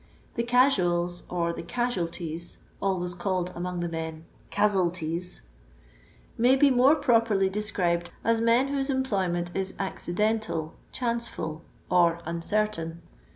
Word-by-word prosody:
The 235 - -1
"casuals" 180 -9 +2
or 170 -1 0
the - - -5
"casualties" 170 -5 -3 0.2
(always 180 -3 0
called 180 0 -1
among 180 0 -3
the 175 - -1
men 160 -1 -5
" - - -30
cazzelties 180 - 0 0.5
"), - - -29
may 250 +3 +6
be 275 +1 +5
more 260 +4 +6
pro 255 -7 +4
perly 200 -4 +1
described 180 -4 0
as 230 0 +2
men 235 +4 +3
whose 275 0 -1
employment 190 -10 0
is 190 0 -2
ac 190 -2 -3
cidental, 210 -5 0 0.2
chanceful, 235 -10 -3 0.3
or 170 -2 +4
uncertain. 170 -1 -1
185 Hz, 130 wpm, -27 LUFS, 170-230 Hz, 0.5 s, may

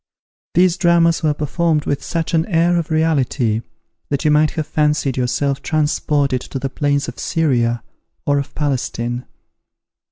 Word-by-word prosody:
These 180 +1 +4
dramas 170 -2 +3
were 155 -2 +1
performed 155 +1 0
with 140 - -1
such 165 0 -3
an 160 0 +2
air 170 -1 +2
of 170 0 -2
reality 140 -8 +1 0.5
that 140 0 -2
you 150 - +4
might 150 +1 +4
have 155 - 0
fancied 150 -3 0
yourself 135 +2 0
transported 145 -3 0
to - - -6
the 135 0 -3
plains 145 -1 0
of - - -7
Syria 120 -7 0 0.4
or 145 0 +2
of 140 - -6
Palestine. 125 -4 -2
150 Hz, 150 wpm, -19 LUFS, 135-165 Hz, 0.5 s, These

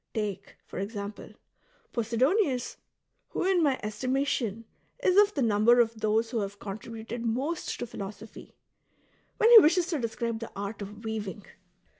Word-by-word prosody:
Take, 205 -3 -4
for - - -7
example, 205 +1 -6 0.6
Posidonius 250 - +1 0.2
— - - -50
who, - - -2
in 375 -2 +3
my 280 -4 +2
estimation, 235 -1 -1 0.4
is 370 - +3
of 415 +1 +5
the 280 - +1
number 225 +2 +4
of 230 -1 +2
those 220 +2 +1
who 235 - 0
have 200 -1 -4
contributed 225 +3 -7
most 265 +9 -2
to - - -2
philosophy 210 -1 -9 0.4
— - - -39
when 455 - +5
he 465 - +13
wishes 345 0 +4
to 320 -5 -1
describe 230 -1 -3
the 230 - -7
ai't 200 +1 -5
of 205 +2 -8
weaving. 210 -2 -4
230 Hz, 155 wpm, -28 LUFS, 210-265 Hz, 0.6 s, he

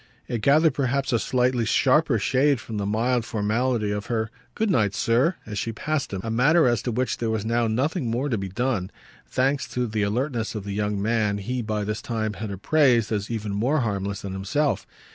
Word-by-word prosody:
It 120 -3 -3
gathered 150 +5 +4
perhaps 135 0 0
a 115 - +3
slightly 125 -1 +1
sharper 130 +4 +3
shade 135 +5 +2
from 110 -2 -6
the 100 -1 -2
mild 120 +3 +1
formality 110 +1 0
of 105 0 -3
her 110 -2 -1 0.2
"Good 220 -2 +1
night, 105 - +2
sir!" 125 - +2
as 105 -2 -4
she 115 - -2
passed 150 +6 -2
him; 95 -2 -3
a 115 - -3
matter 145 +6 +4
as 120 -3 +2
to 125 - -2
which 125 +3 -1
there 115 - -1
was 110 -1 -1
now 115 +1 +1
nothing 130 - 0
more 120 +5 -1
to 120 -5 0
be 95 0 -4
done, 105 -2 -1 0.4
thanks 135 +2 0
to 125 0 -2
the 110 -2 -2
alertness 115 +2 -1
of 105 - -4
the 100 0 -5
young 105 0 -1
man 105 -1 +1
he 125 +5 -3
by 105 -2 -2
this 105 +1 -3
time 110 -2 -2
had 105 +1 -5
appraised 120 +2 +2
as 105 -1 -1
even 110 -3 -3
more 130 +9 +1
harmless 100 -3 -2
than 100 -1 -5
himself. 100 +10 -1
115 Hz, 210 wpm, -24 LUFS, 105-130 Hz, 0.4 s, gathered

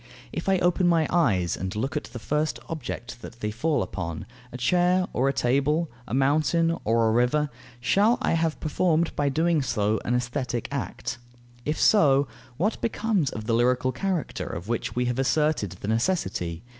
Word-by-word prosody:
If - - -2
I 190 - +4
open 175 0 +2
my 165 -2 +3
eyes 100 - +2
and 95 +2 -4
look 130 +6 -2
at 150 - -2
the 120 - -9
first 150 +6 -1
object 120 -6 -6
that 115 +1 -10
they 105 -1 -2
fall 145 +8 0
upon, 85 -4 -5 0.3
a 125 - -6
chair 180 +8 +3
or 135 +2 +2
a - - 0
table, 140 +5 +1 0.2
a - - -6
mountain 155 +5 +2
or 115 +1 +3
a - - +3
river, 125 +6 +2 0.3
shall 200 - +3
I - - 0
have 165 -1 0
performed 165 +1 +1
by 145 - +1
so - - +3
doing 160 +1 +2 0.4
an 120 - 0
aesthetic 125 -1 -2
act? 120 - -4 0.5
If 150 +1 -1
so, 140 -9 +5 0.3
what 205 +7 0
becomes 220 - 0
of 110 -3 -6
the 115 - 0
lyrical 125 +2 +2
character, 185 +1 -2
of 85 +4 -6
which 115 -1 -2
we 125 0 +1
have 125 +1 -1
asserted 140 - +1
the - - -5
necessity? 110 - -1
135 Hz, 180 wpm, -26 LUFS, 120-165 Hz, 0.5 s, so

